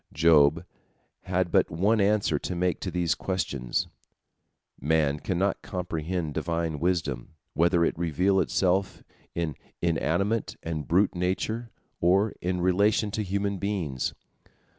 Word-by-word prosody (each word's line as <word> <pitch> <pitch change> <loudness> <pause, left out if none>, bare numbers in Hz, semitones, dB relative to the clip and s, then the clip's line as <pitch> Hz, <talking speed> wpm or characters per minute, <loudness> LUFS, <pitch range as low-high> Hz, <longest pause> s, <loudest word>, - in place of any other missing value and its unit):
Job 80 0 +4 0.6
had - - 0
but - - +3
one 100 +7 +2
answer 100 -7 +2
to 90 - -4
make 90 -1 0
to - - -3
these 85 -2 +1
questions: 70 -10 -2 0.9
man 75 0 +1
cannot 95 +3 -1
comprehend 85 -2 -3
Divine 85 -1 -2
wisdom, 80 -6 -1 0.2
whether 85 0 +3
it - - 0
reveal 90 +4 +2
itself 95 +1 0 0.3
in 85 -4 -2 0.2
inanimate 85 +6 0
and 80 -3 -4
brute 95 +4 +3
nature 95 +6 -2 0.3
or 95 +5 +3
in 90 0 -1
relation 100 +4 +2
to 110 - -2
human 100 0 -1
beings. 85 -11 -2
90 Hz, 120 wpm, -27 LUFS, 80-100 Hz, 0.9 s, Job